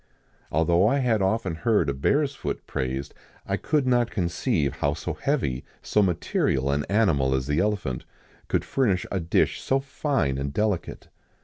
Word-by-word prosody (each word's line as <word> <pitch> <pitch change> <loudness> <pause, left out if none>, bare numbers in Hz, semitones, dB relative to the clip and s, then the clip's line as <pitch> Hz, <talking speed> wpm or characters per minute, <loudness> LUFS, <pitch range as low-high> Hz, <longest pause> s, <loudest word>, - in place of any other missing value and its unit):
Although 85 +5 +3
I 135 - +3
had 120 -6 +2
often 95 -2 0
heard 110 +6 +2
the 70 - -1
bear's 140 - +1
foot - - -5
praised, 65 +2 -3 0.3
I - - 0
could, 150 -3 0
not 120 -2 +2
conceive 85 - -1
how 70 +1 0
so 80 +2 -4
heavy, 75 - -1 0.2
so 105 - +2
material 75 -7 +1
an 70 +1 0
animal 80 -11 +2
as 65 -1 -1
the 75 +3 0
elephant, 100 - -1 0.4
could - - 0
furnish 100 -10 +1
a 95 - 0
dish 85 -1 +1
so 135 - +1
fine 135 - -1
and 70 0 -2
delicate. 105 +3 -2
90 Hz, 165 wpm, -25 LUFS, 70-115 Hz, 0.4 s, Although